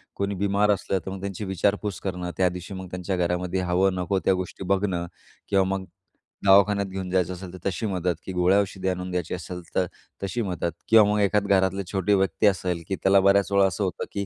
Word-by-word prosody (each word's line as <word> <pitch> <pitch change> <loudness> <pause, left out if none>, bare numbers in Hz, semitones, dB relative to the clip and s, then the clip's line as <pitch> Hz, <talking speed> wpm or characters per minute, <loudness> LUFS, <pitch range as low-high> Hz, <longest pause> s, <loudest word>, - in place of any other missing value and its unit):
कोणी 100 0 -2
बिमार 100 +2 +2
असलं 95 -1 0
तर 95 - -4
मग 95 - -6
त्यांची 100 +1 -4
विचारपूस 100 +1 -1
करणं, 90 -2 -4
त्यादिवशी 90 +1 -1
मग 95 -1 -7
त्यांच्या 90 +1 -3
घरामध्ये 90 +1 -1
हवं 90 +1 +2
नको 95 +1 0
त्या 95 - +5
गोष्टी 95 +1 -4
बघणं. 95 -3 -1 0.4
किंवा 100 -1 +4
मग 95 - -8 0.6
दवाखान्यात 100 +1 +5
घेऊन 95 -1 -5
जायचं 90 -1 +1
असेल 90 0 -9
तर - - -8
तशी 95 +4 -4
मदत, 90 -3 -1
की 95 - -5
गोळ्या 90 +3 +3
औषध 95 -1 -6
आणून 90 0 -2
द्यायची 90 -2 -2
असेल 90 0 -6
तर, 95 - +3 0.4
तशी 110 +5 -2
मदत. 90 -4 -2 0.2
किंवा 110 -2 +7
मग 105 - +1
एखादं 100 0 +2
घरातले 95 0 +2
छोटे 100 +1 +1
व्यक्ती 95 +2 +2
असेल, 90 -4 0
की 95 - -1
त्याला 95 +1 +4
बऱ्याचवेळा 100 0 +4
असं 95 +2 -2
होतं 90 -4 -2
की 100 0 -3
95 Hz, 200 wpm, -25 LUFS, 90-100 Hz, 0.6 s, किंवा